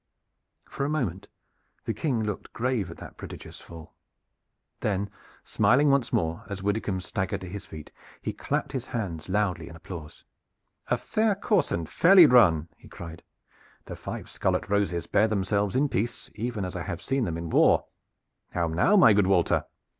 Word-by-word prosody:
For - - -4
a 140 - 0
moment 115 - -2 0.6
the - - -1
King 125 -8 -1
looked 105 -2 -5
grave 120 -3 -1
at - - -9
that - - -11
prodigious - - -9
fall. 80 -1 -12 0.9
Then 100 -1 -1 0.3
smiling 125 +8 +3
once 140 -4 +1
more 80 0 -1
as 100 -1 -5
Widdicombe 100 -2 -1
staggered 95 +2 -3
to 95 - -7
his 100 +2 -7
feet, 80 -1 -10 0.3
he - - -4
clapped - - -2
his 130 -2 -4
hands 90 -9 -4
loudly 95 -4 0
in 80 - -11
applause. 80 -2 -10 0.6
"A - - +1
fair 215 -1 +1
course 200 -5 +1
and 85 -2 -2
fairly 180 0 +7
run!" 90 - +5
he - - -17
cried. 85 -1 -9 0.6
"The - - -7
five - - -7
scarlet - - -1
roses 100 -4 0
bear 110 - +3
themselves 100 -1 0
in 140 +3 +3
peace 120 -2 -3
even 110 -2 -3
as 90 +1 -6
I 90 - -3
have 85 0 -5
seen 135 -2 0
them 85 -4 -3
in 85 -1 -5
war. - - +4 0.7
How 85 - +1
now, 90 - +3
my 180 - +7
good 100 -2 +3
Walter? 95 -3 +2
100 Hz, 170 wpm, -27 LUFS, 85-120 Hz, 0.9 s, fairly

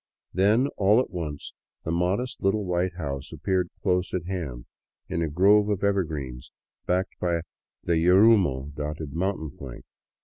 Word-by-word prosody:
Then, 105 +8 +3
all 105 +3 +5
at 130 - -1
once, 75 -5 -5 0.3
the 80 - -3
modest 95 +9 -1
little 100 +1 +1
white 90 0 -1
house 70 -6 -5
appeared 90 -2 -1
close 90 -2 +1
at 90 -2 -3
hand, 80 -11 -5 0.4
in 85 - -2
a 80 - 0
grove 100 +6 +4
of 100 -1 -1
evergreens 75 -11 -2 0.4
backed 90 +2 -1
by 85 -1 0 0.4
the 85 -1 +1
yarumo 90 - +4
dotted 75 0 -5
mountain 85 -3 -2
flank. 65 -4 -10
90 Hz, 145 wpm, -26 LUFS, 75-95 Hz, 0.4 s, all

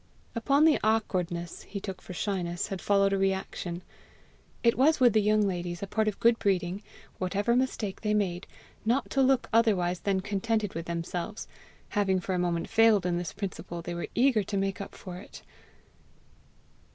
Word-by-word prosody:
Upon 275 +6 +3
the 315 -2 +5
awkwardness 180 -6 -1
he 200 - -6
took 190 -2 -6
for - - -10
shyness, 175 -3 -2
had 195 -2 -4
followed 200 -1 +3
a 195 - +1
reaction. 190 -2 -2 0.8
It 235 -1 +4
was 300 +5 +4
with 245 -4 +5
the 215 - +4
young 210 0 +3
ladies 175 -1 -3
a - - 0
part 215 +2 0
of 210 - -1
good 230 0 +4
breeding, 185 -1 0 0.4
whatever 200 +5 +1
mistake 245 -6 -1
they 210 -1 +1
made, 185 -3 -1 0.4
not 245 +5 0
to 275 - +2
look 265 -1 +3
otherwise 190 -6 +3
than 195 -2 0
contented 210 +1 -1
with 165 +1 -5
themselves: 170 +4 -4 0.4
having 195 -3 +1
for 185 +1 -3
a 180 - 0
moment 170 -1 0
failed 220 -4 +4
in 175 -1 0
this 175 -2 -4
principle, 175 -3 -6
they 175 - -4
were 170 - -4
eager 245 -3 +4
to 200 +1 -3
make 195 0 -1
up 200 - -8
for 180 -2 -8
it. 190 - -12
195 Hz, 175 wpm, -28 LUFS, 180-220 Hz, 0.8 s, the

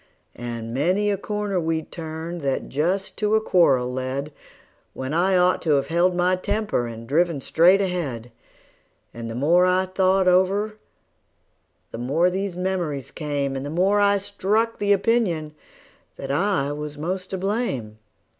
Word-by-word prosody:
And 115 -1 -6
many 185 +10 +1
a - - +1
corner 210 -1 -2
we'd 160 -1 -2
turned 160 +1 -6
that 135 -2 -2
just 180 +8 -1
to 210 0 +1
a - - +5
quarrel 135 -12 +3
led, 130 +3 -3 0.6
When 130 +2 -4
I 185 +3 +3
ought 180 0 +3
to 150 -4 +3
've 140 +1 -5
held 175 +2 +2
my 180 +1 +2
temper, 205 - -1
and 115 0 -8
driven 165 +2 +1
straight 175 +8 +4
ahead; 145 - -3 0.8
And 115 -1 -6
the 115 - -5
more 170 +8 +4
I 185 +1 +2
thought 190 0 +2
it - - +6
over 195 +4 +2 1.2
the - - -6
more 155 +9 +2
these 190 -1 -3
memories 175 -8 -2
came, 145 -3 -2
And 135 - -4
the 145 - -5
more 190 +6 +2
I 200 0 +4
struck 210 +3 -1
the 205 0 +1
opinion 195 -7 +1 0.6
that 135 - -5
I 155 -2 +1
was 150 0 -5
the 145 - -10
most 185 +3 -3
to 190 - -3
blame. 180 - -2
175 Hz, 165 wpm, -23 LUFS, 140-190 Hz, 1.2 s, it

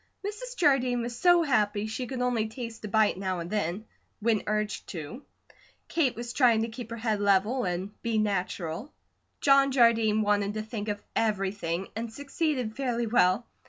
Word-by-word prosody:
Mrs. - - -6
Jardine 255 -7 +3
was 235 0 -4
so 350 +4 +5
happy 210 -7 +1
she 225 +3 -4
could 255 -1 -4
only 235 -3 +1
taste 225 0 -7
a - - -3
bite 210 -2 +2
now 190 -1 -2
and 170 0 -6
then, 205 0 -2 0.3
when 220 -1 +2
urged 210 0 -2
to. 175 - -7 0.7
Kate 295 -7 +1
was 235 +1 -6
trying 235 -5 +4
to 230 - -3
keep 230 0 -8
her 230 - -5
head 220 -2 -1
level, 205 +5 +2
and 180 +2 -2
be 230 -1 -1
natural. 195 - -2 0.5
John 275 -1 +5
Jardine 225 -4 +4
wanted 205 0 +1
to 215 - -2
think 215 -1 -5
of 205 -1 -3
everything, 195 -4 -1
and 225 +1 -4
succeeded 280 -4 -2
fairly 245 -3 -1
well. 215 -1 +3
220 Hz, 170 wpm, -28 LUFS, 205-250 Hz, 0.7 s, so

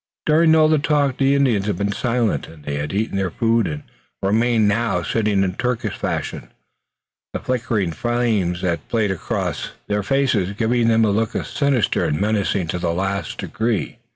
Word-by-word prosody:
During 160 +1 +5
all 155 -1 +5
the 155 -1 +3
talk 145 -3 +1
the 135 0 +3
Indians 120 -8 +2
had 100 -4 -1
been 100 +1 -1
silent. 120 0 0 0.2
They 70 0 -2
had 75 +1 -3
eaten 100 0 -1
their 95 -2 0
food 115 +1 +1
and 75 -1 -5 0.4
remained 110 +2 +3
now, 115 +3 +1
sitting 105 -3 +1
in 90 -1 -1
Turkish 125 +3 -2
fashion, - - -4 0.8
the - - -2
flickering 110 -7 -1
flames 110 -4 0
that 85 -4 -2
played 110 -4 +1
across 95 - -3
their 105 0 -1
faces 110 -5 +1
giving 115 +2 +1
to 115 - +4
them 110 0 +4
a 105 - +2
look 110 +2 0
sinister 140 - +1
and 75 - 0
menacing 100 -3 0
to 90 - -2
the 85 -1 0
last 95 +3 -2
degree. 110 -1 -2
110 Hz, 175 wpm, -21 LUFS, 95-120 Hz, 0.8 s, During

